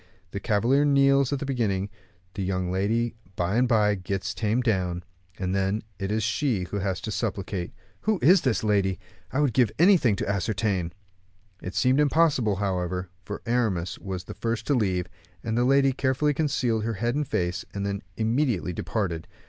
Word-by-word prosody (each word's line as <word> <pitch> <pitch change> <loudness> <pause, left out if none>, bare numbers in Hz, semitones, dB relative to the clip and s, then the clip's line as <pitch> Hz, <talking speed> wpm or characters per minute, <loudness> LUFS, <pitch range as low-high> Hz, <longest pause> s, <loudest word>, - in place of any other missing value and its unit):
The 100 - -4
cavalier 120 +7 +2
kneels 140 -1 +4
at 140 - +1
the 140 - -4
beginning, 105 -8 0 0.5
the 100 - -4
young 90 -1 -1
lady 110 +5 0 0.2
by 90 +4 0
and 125 +2 +3
by 105 -3 +3
gets 95 0 -3
tamed 115 +3 0
down, 90 -6 0 0.3
and 95 -1 -2
then 100 +2 0 0.2
it 100 0 -2
is 110 0 0
she 110 -1 0
who 100 +3 -4
has 95 -1 -1
to 110 - -4
supplicate. 100 -4 -3 0.3
Who 215 -1 +1
is 180 +4 +6
this 130 -5 0
lady? 100 -3 +2 0.3
I 145 - +1
would 140 -6 +2
give 120 -4 +3
anything 170 - +5
to - - -3
ascertain." 100 -2 -1 0.7
This 90 - -7
seemed 130 +2 +3
impossible, 145 -7 +3
however, 90 -2 -2
for 105 - -6
Aramis 110 -8 0
was 95 -2 -5
the - - -8
first 115 -1 -3
to 145 - +1
leave; 95 -8 +1 0.4
the 115 +2 0
lady 135 +1 +4
carefully 135 +3 +1
concealed 135 -7 0
her 115 0 -2
head 120 +4 -1
and 145 0 -1
face, 90 -2 -1
and 100 0 -3
then 100 0 -2 0.2
immediately 115 - 0
departed. 85 -3 -3
110 Hz, 175 wpm, -26 LUFS, 95-130 Hz, 0.7 s, is